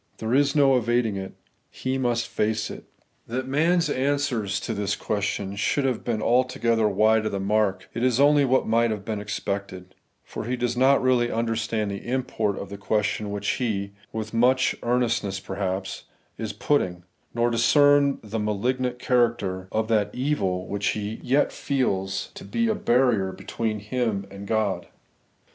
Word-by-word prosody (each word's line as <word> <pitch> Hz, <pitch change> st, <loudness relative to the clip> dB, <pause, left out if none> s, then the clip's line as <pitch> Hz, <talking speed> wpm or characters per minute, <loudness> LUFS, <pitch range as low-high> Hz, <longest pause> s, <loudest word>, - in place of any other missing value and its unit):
There 110 Hz, +1 st, -2 dB
is 140 Hz, +1 st, +3 dB
no 135 Hz, -3 st, +5 dB
evading 120 Hz, -2 st, +1 dB
it: 95 Hz, 0 st, -6 dB, 0.4 s
he 130 Hz, +1 st, -3 dB
must 120 Hz, -2 st, 0 dB
face 105 Hz, 0 st, -1 dB
it. -, -, -9 dB, 0.4 s
That 130 Hz, +3 st, -3 dB
man's 165 Hz, +5 st, +2 dB
answers 130 Hz, -8 st, 0 dB
to 115 Hz, -, -3 dB
this 100 Hz, -1 st, -1 dB
question 100 Hz, -1 st, -2 dB
should 135 Hz, +7 st, 0 dB
have 130 Hz, -3 st, -1 dB
been 110 Hz, -3 st, -1 dB
altogether 120 Hz, -2 st, +2 dB
wide 110 Hz, +2 st, +3 dB
of -, -, -3 dB
the 100 Hz, -, -2 dB
mark, 100 Hz, -1 st, 0 dB
is 125 Hz, +1 st, +1 dB
only 145 Hz, 0 st, +5 dB
what 130 Hz, -1 st, +2 dB
might 115 Hz, +1 st, +2 dB
have 105 Hz, -2 st, -4 dB
been 110 Hz, -2 st, -3 dB
expected; 100 Hz, -3 st, -4 dB, 0.3 s
for -, -, -7 dB
he 125 Hz, +2 st, -1 dB
does 120 Hz, 0 st, -1 dB
not 130 Hz, +2 st, +4 dB
really 125 Hz, -2 st, +3 dB
understand 115 Hz, -2 st, -1 dB
the 100 Hz, -, -6 dB
import 120 Hz, -5 st, -1 dB
of 100 Hz, -, -6 dB
the 100 Hz, 0 st, -8 dB
question 105 Hz, 0 st, -1 dB
which 100 Hz, 0 st, -4 dB
he, 100 Hz, -6 st, -1 dB, 0.2 s
with 110 Hz, 0 st, -5 dB
much 130 Hz, +3 st, +3 dB
earnestness 120 Hz, -5 st, 0 dB
perhaps, 95 Hz, 0 st, -4 dB, 0.3 s
is 110 Hz, -1 st, -4 dB
putting, 90 Hz, -11 st, 0 dB, 0.3 s
nor 120 Hz, 0 st, +2 dB
discern 145 Hz, +4 st, +4 dB
the 110 Hz, +1 st, -4 dB
malignant 125 Hz, +4 st, -1 dB
character 115 Hz, -7 st, 0 dB
of 110 Hz, 0 st, 0 dB
that 105 Hz, -2 st, +2 dB
evil 100 Hz, -10 st, -1 dB
which 100 Hz, 0 st, -1 dB
2 -, -, -3 dB
The 105 Hz, -, -4 dB
Evcrlading 105 Hz, -, -3 dB
EigMcoumess^ -, -, -10 dB
he -, -, -12 dB
yet 140 Hz, +3 st, +3 dB
feels 95 Hz, -9 st, -1 dB
to -, -, -10 dB
be 230 Hz, -1 st, 0 dB
a 220 Hz, -, +2 dB
barrier 120 Hz, -, +2 dB
between 110 Hz, +3 st, -3 dB
him 105 Hz, -2 st, -2 dB
and 100 Hz, +1 st, -9 dB
God. 100 Hz, -5 st, 0 dB
115 Hz, 170 wpm, -25 LUFS, 100-125 Hz, 0.4 s, no